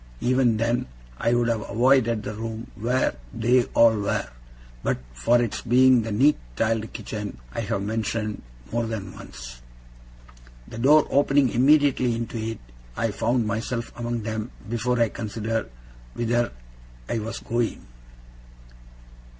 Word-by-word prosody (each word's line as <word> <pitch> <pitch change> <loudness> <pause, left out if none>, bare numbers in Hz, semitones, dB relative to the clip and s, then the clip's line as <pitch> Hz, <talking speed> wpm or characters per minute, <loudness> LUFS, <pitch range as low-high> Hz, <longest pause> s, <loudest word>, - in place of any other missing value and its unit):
Even 125 -2 +2
then, 115 +2 0 0.3
I 120 - +2
would 120 -1 +2
have 115 -2 0
avoided 115 -1 +3
the 105 - -4
room 115 +1 -6
where 115 - 0 0.2
they 120 +2 +3
all 115 -1 +6
were, 100 -1 -1 0.5
but - - 0 0.2
for 115 - +3
its 120 -3 -1
being 125 +1 +5
the 110 0 -4
neat 135 +9 +4 0.2
tiled 110 - 0
kitchen 105 - -6 0.2
I - - -3
have 105 -2 -2
mentioned 110 0 -2 0.3
more 115 0 0
than 100 -4 -5
once. - - -10 1.1
The 115 - -8
door 145 +5 +6
opening 140 -1 +4
immediately 135 -2 +4
into 115 0 -4
it, 110 0 -3 0.4
I 115 - 0
found 120 +3 0
myself 115 +2 -3
among 120 -1 -3
them 110 +1 -3 0.2
before 120 +2 0
I 115 -1 +3
considered 110 +1 -3 0.5
whither 120 0 0 0.6
I 115 - -1
was 110 +1 -5
going. 115 - -2
115 Hz, 135 wpm, -25 LUFS, 110-120 Hz, 1.1 s, all